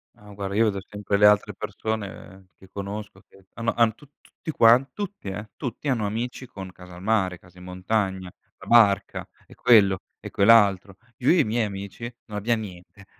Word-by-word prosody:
Ah, 105 0 -15
guarda, 100 0 -5
io 115 - +4
vedo 100 -3 0
sempre 105 0 -3
le 105 - +7
altre 105 0 +3
persone 100 -3 -6
che 95 - -18
conosco 100 +1 -7
che 95 -1 -21
hannno 115 +1 -2
hanno 115 -2 +3
tu 145 - -18
tutti 160 - -9
quan 125 +1 +5
tutti, 200 - -6
eh, 105 +3 -6
tutti 130 +2 -6
hanno 115 -5 0
amici 120 +4 -4
con 95 -4 -9
casa 90 0 -13
al 90 - -11
mare, 95 -5 +1
casa 90 +1 -21
in 90 - -12
montagna, 95 0 -2 0.3
la - - -12
barca 110 -5 +3 0.2
e - - -16
quello 100 -6 +4 0.2
e - - -9
quell'altro. 100 -3 +4 0.2
Io 125 - 0
e 175 - +5
i 155 - +5
miei 110 +1 0
amici 100 +4 -7
non 105 -2 -7
abbiam 115 +2 0
niente. 95 0 -11
105 Hz, 190 wpm, -24 LUFS, 95-115 Hz, 0.3 s, le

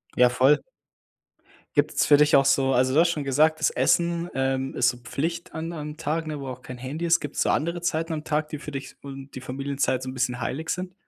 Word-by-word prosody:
Ja, 125 0 +6
voll. 130 +4 +4 1.2
Gibt's - - +2
für 145 - +7
dich 150 0 +5
auch 135 0 +5
so 135 -1 +3
also 130 +1 +2
du - - +6
hast 170 0 +5
schon 150 -4 -3
gesagt, 155 +4 +3
das 155 - +3
Essen, 170 0 +1
ähm, 135 0 -1
ist 120 - +3
so 125 - -4
Pflicht 165 +7 -4
an 165 +1 -4
am 150 -1 -6
Tag, 160 +1 -2
ne, 155 -2 -5
wo 135 - -6
auch 125 0 -7
kein 125 -1 -9
Handy, 145 +7 -4
es 165 0 +4
gibt's 145 - -2
so - - 0
andere 170 +2 0
Zeiten 165 -1 -1
am 155 -1 -4
Tag, 150 0 -1
die 150 - -5
für 150 - -8
dich 135 -1 -7
und 135 0 -9
die 130 - -6
Familienzeit 135 0 -2
so 130 - -5
'n - - -6
bisschen 125 -1 -1
heilig 155 +7 -3
sind? 180 0 -4
145 Hz, 240 wpm, -25 LUFS, 130-160 Hz, 1.2 s, für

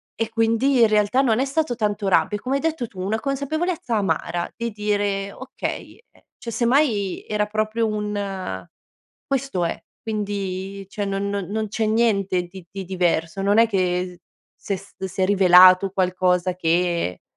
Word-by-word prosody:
E 225 - -1
quindi, 230 +4 +2
in 230 - +7
realtà, 210 +4 +3
non 235 -4 +2
è 265 - +2
stato 275 -2 -1
tanto 210 -3 -1
rabbia, 210 +2 +2
è - - -14
come 260 +2 -1
hai 275 - 0
detto 315 -7 -1
tu: 190 - -13
"una 215 +4 -1
consapevolezza 280 0 -2
amara" 185 -4 -1
di 235 0 -3
dire: 205 -1 -1
"Okay, 260 +4 -6
ehm" - - -25 0.2
cioè, 235 - -6
semmai 235 -4 +1
era 210 0 0
proprio 215 +2 -1
un 200 - -4 0.6
questo 270 -9 -1
è. 165 - -1 0.2
Quindi 200 -2 -4
cioè 205 +1 -4
no 195 -1 -2
non 200 -2 -2
non 215 +2 -2
c'è 220 +1 -1
niente 205 -5 +2
di 175 +1 -11
di 195 -1 -6
diverso, 175 -1 -1
non 205 +2 +3
è 230 - +7
che 180 -3 -1 0.3
se 200 - -4
s 195 +2 -15
si 190 0 -5
è - - +5
rivelato 185 -1 +7
qualcosa 185 -1 +1
che 170 - 0
205 Hz, 165 wpm, -22 LUFS, 185-225 Hz, 0.6 s, in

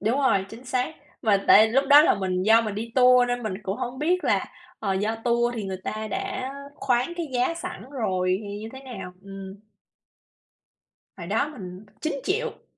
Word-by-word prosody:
Đúng 225 +6 +1
rồi, 200 -8 +3
chính 230 +5 -11
xác. 255 +5 -1 0.3
Mà 200 -3 +2
tại 220 - +8
lúc 270 +5 +2
đó 290 +1 +9
là - - +4
mình 185 -1 -1
do 225 +3 +6
mình 215 -3 -3
đi 230 +2 -5
tour 250 -1 +6
nên 245 0 -1
mình 215 -4 -3
cũng 195 0 -3
hổng 255 0 -4
biết 350 +5 +1
là, - - +2 0.3
ờ, 200 -3 -1
do 210 +4 -1
tour 240 0 +2
thì 220 -4 -4
người 190 -1 -3
ta 215 0 -4
đã 380 - -3 0.2
khoán 250 +3 0
cái 340 -2 -3
giá 250 +7 +1
sẵn 355 +1 -7
rồi 185 -8 0
thì 205 0 -6
như 220 - -6
thế 265 - -9
nào, 190 -9 -8
ừm. 195 -1 -9 1.6
Hồi 170 - -7
đó 220 +9 0
mình 190 -7 -9 0.2
9.000.000. 350 - -2
230 Hz, 195 wpm, -25 LUFS, 200-265 Hz, 1.6 s, đó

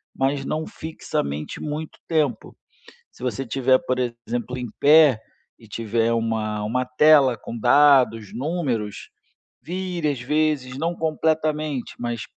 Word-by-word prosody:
mas 135 +1 0
não 155 +3 -3
fixamente 75 - -5
muito 150 +1 -5
tempo. 150 -8 -1 0.6
Se - - -18
você 130 +1 -3
tiver, 130 +2 +3
por 130 0 -2
exemplo, 120 +1 -3
em 125 -1 -5
pé 150 -5 +6 0.4
e 115 - -17
tiver 115 +2 -1
uma 110 -2 -1
uma 125 +4 -1
tela 135 -1 +5
com 115 +2 -7
dados, 125 -4 +4
números, 130 - -3 0.5
vire 175 0 -3
às 135 -4 -4
vezes, 145 -1 0
não 170 +3 -1
completamente, 155 -3 -1
mas 120 -2 -3
130 Hz, 125 wpm, -23 LUFS, 115-155 Hz, 0.6 s, pé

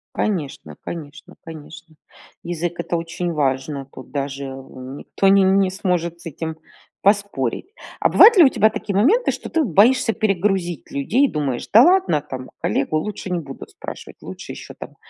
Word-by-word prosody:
Конечно 170 -10 -3
конечно 155 -1 -8
конечно. 160 0 -11 0.5
Язык- 175 0 -4
это 170 - -2
очень 170 +1 -4
важно, 135 -1 -1
тут 130 - -12
даже, 140 0 -4
э, - - -5
никто 135 +7 -5
н 195 0 +5
не 190 -1 +2
сможет 180 -3 -2
с - - -16
этим 160 0 -5 0.4
поспорить. 200 - 0 0.3
А - - +2
бывают 455 +2 +8
ли 350 - +9
у - - +7
тебя 220 -4 +3
такие 205 -2 -5
моменты, 345 - +3
что - - -7
ты 325 -2 +1
боишься 225 - +4
перегрузить 195 -5 -1
людей? 235 - +2
Думаешь: 140 - -3
"Да 225 - +9
ладно, 365 - +3
там 130 -3 -8
коллегу 155 - 0
лучше 195 +2 -5
не 180 -1 -1
будут 135 -4 -10
спрашивать, - - -9
лучше - - -8
еще - - -10
там - - -11
170 Hz, 165 wpm, -21 LUFS, 145-205 Hz, 0.5 s, ли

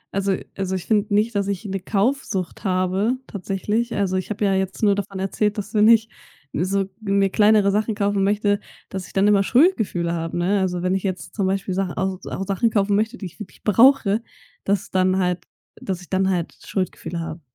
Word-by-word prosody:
Also 195 -1 +1 0.2
also, 190 -1 -2
ich 185 - -5
finde 210 -1 +1
nicht, 215 +3 +2
dass 200 -1 0
ich 200 +1 -3
'ne 195 -1 -3
Kaufsucht 205 -2 -1
habe 190 +5 +1
tatsächlich. 210 +4 -2
Also, 195 -2 0
ich 185 +2 -2
habe 210 0 -1
ja 195 - +2
jetzt 190 +3 -2
nur 205 -1 +5
davon 195 -1 -4
erzählt, 210 +2 -1
dass 205 +1 -5
wenn 210 0 +5
ich 225 -1 +6 0.5
so 190 +4 0 0.2
mir 195 -2 +1
kleinere 210 -2 +4
Sachen 210 +1 0
kaufen 200 -1 +1
möchte 205 0 +2 0.3
dass 185 -3 -5
ich - - -16
dann 195 +1 +3
immer 205 -1 +5
Schuldgefühle 220 - +2
habe, 165 0 -3
ne? 190 +4 +1
Also, 180 -1 -1
wenn 185 +1 +1
ich 190 - 0
jetzt 185 -1 -4
zum 195 -3 0
Beispiel 195 -1 -1
Sachen 190 -1 -1
auch 190 0 -2
auch 195 - -4
Sachen 200 +4 +1
kaufen 200 -1 +1
möchte, 220 +4 0
die 200 - -7
ich 180 - -10
wirklich 210 -4 -11
brauche, 225 0 +4 0.4
dass 195 -1 0
dann 185 0 +2
halt 180 -1 0 0.4
dass 185 -2 -3
ich 180 - -14
dann 190 0 +2
halt 175 -3 -1
Schuldgefühle 185 -2 -3
habe. 165 0 -6
195 Hz, 205 wpm, -22 LUFS, 185-210 Hz, 0.5 s, ich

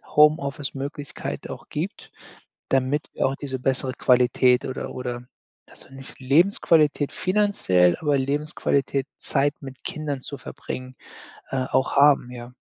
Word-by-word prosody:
Homeoffice-Möglichkeit 145 -1 0
auch - - -9
gibt, - - -5 0.6
damit 135 +3 +1
wir - - -1
auch 135 +1 -2
diese 135 -2 -5
bessere 130 0 0
Qualität 125 0 +3
oder 130 - -4
oder 125 -1 -5 0.4
dass - - -12
wir - - -20
nicht 135 0 -11
Lebensqualität 150 0 +3
finanziell, 185 - +2
aber 145 -3 +2
Lebensqualität 140 -1 -1
Zeit 145 +1 0
mit 135 -1 -10
Kindern 150 -3 -4
zu 140 - -7
verbringen, 130 0 -7 0.5
äh, 130 -1 -1
auch 130 +2 +1
haben, 140 -3 +5
ja. 125 0 -9
135 Hz, 130 wpm, -24 LUFS, 130-145 Hz, 0.6 s, haben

